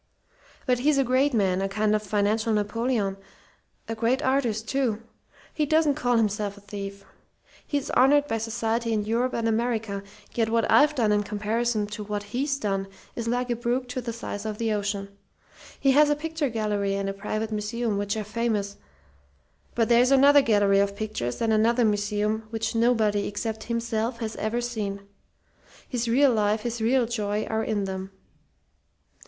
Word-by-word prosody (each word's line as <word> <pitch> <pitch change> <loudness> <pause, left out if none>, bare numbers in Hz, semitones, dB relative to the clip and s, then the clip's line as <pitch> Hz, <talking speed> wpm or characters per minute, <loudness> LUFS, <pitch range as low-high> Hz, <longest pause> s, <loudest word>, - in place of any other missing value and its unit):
"But 250 -2 +2
he's 290 +3 +2
a 275 - +4
great 260 +3 +2
man, 190 -5 +1
a 195 - -1
kind 210 +1 +1
of 215 - +1
financial 215 +2 0
Napoleon 210 -1 0 0.7
a 225 - -2
great 235 +5 0
artist, 240 -5 0
too. 240 -5 -1 0.5
He 300 -2 0
doesn't 310 -1 +3
call 245 -4 +1
himself 210 -2 0
a - - -13
thief. 200 -1 -7 0.6
He's 290 -1 -2
honoured 285 +3 +5
by 225 -3 -1
society 230 +1 -1
in 210 -1 0
Europe 240 +3 0
and 230 -1 0
America; 225 -3 -1 0.3
yet 225 -2 +1
what 230 0 +2
I've 300 +1 +5
done 225 -6 +2
in 210 0 +3
comparison 215 +2 -1
to 210 +1 -6
what 205 0 -4
he's 270 +7 -2
done 195 -5 -2 0.3
is 235 -1 -4
like 245 +1 0
a - - +1
brook 240 +2 -1
to 255 +1 -3
the 235 -1 -4
size 215 -3 -6
of 215 -1 -4
the 225 -1 0
ocean. 200 -1 -2 0.7
He 275 - +4
has 295 +2 +5
a 295 - +3
picture 315 -1 -2
gallery 210 -3 -1
and 195 0 -2
a 195 - -2
private 215 +2 -3
museum 215 0 -2
which 205 +1 -2
are 215 - -2
famous; 210 -2 -2 1.0
but 230 -2 +2
there's 245 +1 +5
another 280 +1 +6
gallery 205 -5 +3
of 200 0 +1
pictures 210 - -3
and 225 -1 +2
another 230 +2 +3
museum 210 +1 0
which 225 -1 -2
nobody 225 -3 +2
except 220 +1 -4
himself 230 0 -2
has 225 -1 -4
ever 220 +3 -1
seen. 210 -5 -3 0.9
His 245 -2 -2
real 260 +3 +4
life, 210 0 +1
his 235 0 -4
real 245 +2 +3
joy, 215 -2 -2
are 220 0 -1
in 205 -2 -1
them. 190 0 -4
225 Hz, 175 wpm, -26 LUFS, 205-240 Hz, 1.0 s, another